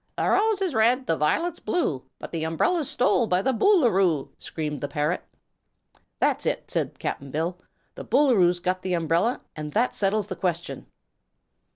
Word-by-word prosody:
"The - - 0
rose 425 -1 +2
is 365 -6 -1
red, 245 +4 +3
the 165 - +1
violet's 310 - 0
blue, 165 - -1 0.2
But - - -9
the 165 -2 -3
umbrel's 280 - 0
stole 245 -1 +2
by 180 0 +1
the 265 - +1
Boo 395 - +4
loo 240 -4 +4
roo!" 175 -7 +1
screamed 150 -4 -5
the 145 - -2
parrot. 150 +1 -1 0.9
"That's - - +1
it," - - -2
said - - -2
Cap'n 140 - -4
Bill; 165 +5 -2 0.3
"the - - -8
Boolooroo's 220 -10 +3
got 185 +1 -1
the 185 -1 -1
umbrel, 170 +8 +1 0.2
an' 150 -1 -5
that 230 +10 +1
settles 205 +1 +1
the 195 -2 -6
question." 170 -1 -3
185 Hz, 175 wpm, -25 LUFS, 165-250 Hz, 0.9 s, Boo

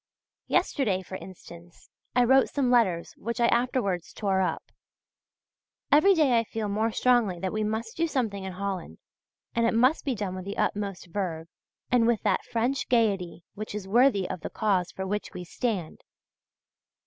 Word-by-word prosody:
Yesterday, 200 -9 +1
for 185 - -13
instance, 175 -2 -13 0.2
I 250 - +5
wrote 265 +2 +4
some 265 -4 0
letters 190 -9 +2
which 235 +2 -4
I 235 - +4
afterwards 235 -8 0
tore 195 -2 0
up. 185 - -2 1.2
Every 375 +7 +6
day 275 -8 +4
I - - 0
feel 220 -1 -4
more 215 +3 +1
strongly 230 -8 +2
that 190 +1 -3
we 215 0 -1
must 220 +2 -3
do 335 +1 +1
something 225 -10 -2
in 190 -1 -5
Holland, 185 - -4 0.6
and 230 0 +2
it 230 - +1
must 255 +7 +3
be 270 -4 -1
done 200 -3 -3
with 185 0 -6
the 200 - -5
utmost 200 -3 -2
verve 170 -3 -4 0.4
and 240 -2 +4
with 235 -2 +1
that 200 -4 +1
French 245 +5 -1
gaiety 200 -8 +1
which 215 0 -6
is 205 -2 -5
worthy 220 -3 +3
of 180 - -5
the - - -5
cause 195 -5 0
for 190 - -5
which 205 +2 -4
we 180 - -5
stand. 190 -3 -3
210 Hz, 170 wpm, -27 LUFS, 185-240 Hz, 1.2 s, Every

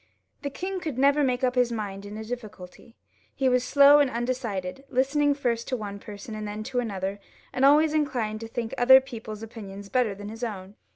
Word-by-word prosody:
The 285 - -3
king 375 +6 -4
could 310 -8 -5
never 280 +2 +4
make 255 -1 0
up 250 -1 +2
his 250 -1 +2
mind 205 -3 -5
in 210 +1 -8
a 220 - -5
difficulty; 220 -2 -9 0.4
he 265 - +1
was 250 -1 +3
slow 280 +3 +7
and 285 -2 +3
undecided, 235 -3 -3
listening 285 +3 +2
to - - -18
first 235 -2 -1
one 205 -5 -4
person 205 +2 -9
and 215 -1 -5
then 210 +1 -5 0.2
another, 195 -3 -4 0.3
and 255 - -1
always 300 +3 +5
inclined 245 -8 -1
to 225 - -7
think 230 0 -4
other 260 +2 +8
people's 225 -4 -8
opinions 200 -3 -9
better 240 -5 +1
than 205 +1 -8
his 225 +2 -8
own. 195 -4 -5
235 Hz, 195 wpm, -26 LUFS, 210-265 Hz, 0.4 s, other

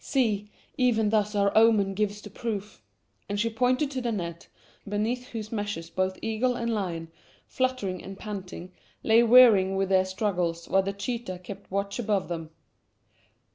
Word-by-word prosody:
"See, 210 -6 0 0.3
even 225 -4 +3
thus 210 -1 +1
our 200 -1 +2
omen 215 -3 +5
gives 210 +1 -2
the - - -10
proof," 210 - -5 0.5
and 205 0 -2
she 230 +2 +1
pointed 255 +5 +1
to 260 -2 -3
the 240 -1 -1
net, 170 -5 -5 0.4
beneath 230 +5 -1
whose 215 -2 -6
meshes 205 -7 -4
both 185 0 -1
eagle 225 +3 0
and 235 -1 -1
lion, 170 -6 -3 0.3
fluttering 255 -9 -2
and 195 +1 -8
panting, 185 -4 -7 0.3
lay 225 +1 +5
wearied 225 -6 +7
with 195 -1 0
their 190 -1 +4
struggles, 180 -4 -2
while 195 - +3
the 195 +1 -2
cheetah 200 -1 -4
kept 200 +2 -9
watch 200 +3 -2
above 205 -5 0
them. 165 -2 -4
205 Hz, 160 wpm, -27 LUFS, 190-230 Hz, 0.5 s, wearied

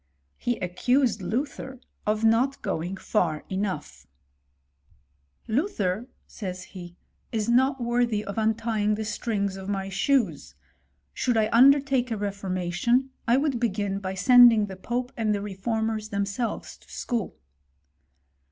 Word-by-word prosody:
He 240 -1 -1
accused 235 +5 +1
Luther 260 +6 -3 0.3
of 215 +1 +1
not 235 +5 +2
going 175 +4 -3
far 170 -7 0
enoughi; 190 -5 -4 0.7
" 70 0 -39
Luther, 220 - -1 0.2
says 185 -3 -6
he, 175 -2 -11 0.2
" - - -44
is 220 -2 -1
not 260 +3 +3
worthy 235 -3 0
of 200 +2 -4
untying 220 -1 +1
the 215 +1 -4
strings 200 -3 -2
of 190 +1 -7
my 195 -1 -2
shoes: 190 - 0 0.6
should 245 - 0
I 215 -1 +2
undertake 270 0 +5
a 225 - -1
reformatioQ^ 200 +5 0 0.2
I 235 +2 +4
would 275 -3 0
begin 205 -4 -1
by 190 -1 -4
sending 240 +1 +7
the 195 -2 -8
pope 245 +6 -3
and 215 -2 +1
the - - -2
reformeni 215 +2 -2
themselves 200 +3 -3
to - - -21
school." 235 -6 -3
215 Hz, 135 wpm, -26 LUFS, 190-240 Hz, 0.7 s, sending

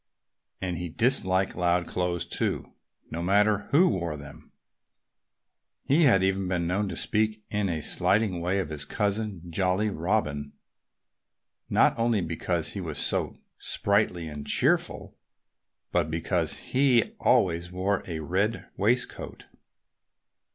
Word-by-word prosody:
And 90 -2 -3
he 90 0 -4
disliked 95 -3 +1
loud 90 0 +1
clothes, 90 -1 -1
too 85 - -2 0.4
no 85 - -3
matter 105 +3 +2
who 170 +6 +5
wore 85 -6 -1
them. 70 -1 -12 1.3
He 155 +4 +4
had 95 -8 +5
even 95 0 0
been 90 -2 -1
known 95 +4 0
to 85 - -5
speak 110 +3 -1
in 105 -2 0
a 80 -3 -2
slighting 100 0 +1
way 90 +3 0
of 95 -6 -2
his 75 -2 -2
cousin, 105 -1 -2
Jolly 95 +4 +1
Robin, 75 -6 -1 1.2
not - - +4
only 115 -2 +2
because 85 0 -2
he 100 - -5
was 80 -5 -5
so - - +2 0.2
sprightly 100 -5 0
and 75 -1 -7
cheerful, - - +1 0.8
but 85 -3 +1
because 80 +1 0
he 130 -4 +2
always 85 -1 +2
wore 95 +2 0
a 80 -3 -4
red 100 +8 -1
waistcoat. 120 +5 -1
95 Hz, 130 wpm, -27 LUFS, 85-105 Hz, 1.3 s, who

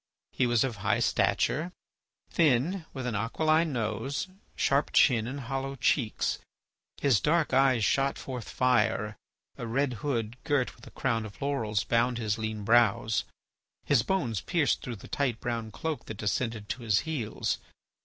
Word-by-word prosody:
He 125 - +1
was 120 -2 +3
of 125 -5 -2
high - - +1
stature, 160 +6 +1 0.6
thin, 160 +3 +2
with 130 -2 -5
an 125 - -1
aquiline 155 +10 +1
nose, 115 - -2 0.3
sharp 140 +2 +1
chin, 115 -5 +4
and 140 +3 -5
hollow 135 +2 -3
cheeks. 125 -3 +1 0.6
His 135 -7 +4
dark 155 -2 +2
eyes 130 -4 +4
shot 135 0 +2
forth 125 -4 -6
fire; 110 -4 +1 0.4
a 115 - -4
red 130 +3 0
hood 120 -5 -2
girt 145 -5 0
with - - -15
a - - -9
crown 115 -4 -1
of 105 -2 -10
laurels 115 -8 0
bound 120 +1 +1
his 110 -1 -1
lean 110 -1 -3
brows. 110 -1 +3 0.6
His 140 -5 +4
bones 125 - -1
pierced 165 -5 +1
through 125 - -5
the 100 - -12
tight 130 -6 -1
brown 115 -2 -3
cloak 160 +7 -4
that 110 - -7
descended 110 +1 -2
to 120 +2 -3
his 110 -4 +2
heels. 140 -9 -2
125 Hz, 155 wpm, -29 LUFS, 110-140 Hz, 0.6 s, chin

